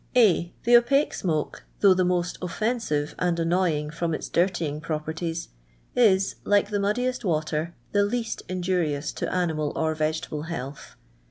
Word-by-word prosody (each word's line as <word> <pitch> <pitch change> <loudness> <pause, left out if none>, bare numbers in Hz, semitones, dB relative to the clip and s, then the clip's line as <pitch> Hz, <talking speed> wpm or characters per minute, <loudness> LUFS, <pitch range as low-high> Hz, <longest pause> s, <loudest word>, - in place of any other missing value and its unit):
A. 185 -8 +4
The 240 +1 +6
Opaque 275 +5 +2
smoke, 155 -5 -2 0.2
though 200 -2 +7
the 185 0 +2
most 180 -1 0
offen 215 +7 -1
sive 150 -9 -2
and 175 -2 +1
annoying 165 -3 +1
from 165 0 -1
its - - -6
dirtying 170 -4 0
properties, 160 +1 -3 0.5
is, 195 -6 +3
like 205 0 +2
the 205 - +1
muddiest 245 +6 0
water, 155 -1 -1 0.2
the 205 - +3
least 225 +2 -2
injurious 175 -5 -1
to - - -4
animal 160 -5 0
or 160 0 +1
vegetable 155 0 -2
health. 140 -3 -6
175 Hz, 150 wpm, -26 LUFS, 155-200 Hz, 0.5 s, though